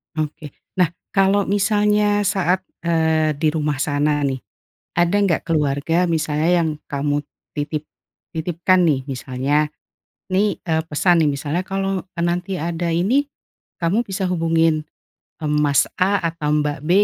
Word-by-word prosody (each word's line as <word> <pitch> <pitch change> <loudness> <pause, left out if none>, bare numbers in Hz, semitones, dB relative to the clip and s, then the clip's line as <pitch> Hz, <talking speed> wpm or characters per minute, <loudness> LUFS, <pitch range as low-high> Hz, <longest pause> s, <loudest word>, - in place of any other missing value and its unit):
Oke, 155 -1 -4 0.2
nah, 180 - +5 0.2
kalau 195 +1 +3
misalnya 205 +1 +2
saat, 190 -2 +1 0.2
eee, 160 -2 +2
di 155 +2 +1
rumah 150 -2 -1
sana 145 0 +1
nih, 135 -2 0 0.5
ada 175 +2 +2
nggak 170 -4 0
keluarga, 155 +2 +1
misalnya 160 -1 +1
yang 165 -1 +1
kamu 145 +1 -1 0.3
titip 150 +1 -3 0.5
titipkan 175 +3 +2
nih 140 -5 +1
misalnya, 140 +3 -1 0.6
nih, 200 +2 +1
eee, 160 -2 -1
pesan 170 +3 +3
nih, 150 - +3
misalnya 145 +5 -2
kalau, 195 -1 -2
eee, 180 -2 -6
nanti 180 +2 -2
ada 170 +1 -2
ini, 240 - +1 0.5
kamu 180 +7 +1
bisa 195 -3 -3
hubungin, 165 -3 +2 0.6
eee, 150 - 0
Mas 150 -2 +3 0.2
A 195 +2 +4 0.2
atau 155 -3 -4
Mbak 145 -2 -1
B 155 - -5
165 Hz, 135 wpm, -21 LUFS, 150-185 Hz, 0.6 s, nah